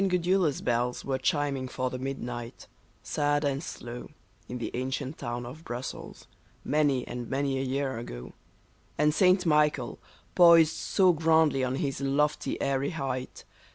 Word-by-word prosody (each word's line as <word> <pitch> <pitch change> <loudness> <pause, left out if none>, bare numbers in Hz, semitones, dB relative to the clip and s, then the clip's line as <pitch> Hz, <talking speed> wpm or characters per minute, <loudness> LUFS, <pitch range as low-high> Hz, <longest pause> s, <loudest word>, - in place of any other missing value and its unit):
Gudula's 180 -3 +1
bells 120 +1 -1
were 135 -1 -1
chiming 140 -1 0
for 130 0 -3
the 130 - -5
midnight, 120 -3 -5 0.4
sad 145 0 0
and 140 0 0
slow, 120 -6 -8 0.4
In 125 - -4
the 120 - -4
ancient 130 +3 -3
town 120 +1 -4
of 145 +7 -9
Brussels, 120 -1 -7 0.4
many 145 -4 +1
and 120 -1 -6
many 135 0 0
a - - -1
year 135 -2 -2
ago, - - -8 0.6
And 150 +1 +3
St. 185 +2 +4
Michael, 150 -5 +2 0.3
poised 170 -3 +7
so 185 -3 +3
grandly 160 -3 +3
on 130 0 0
his 140 -1 -2
lofty, 145 +2 0
airy 140 0 0
height. 135 -6 -4
135 Hz, 145 wpm, -28 LUFS, 125-150 Hz, 0.6 s, poised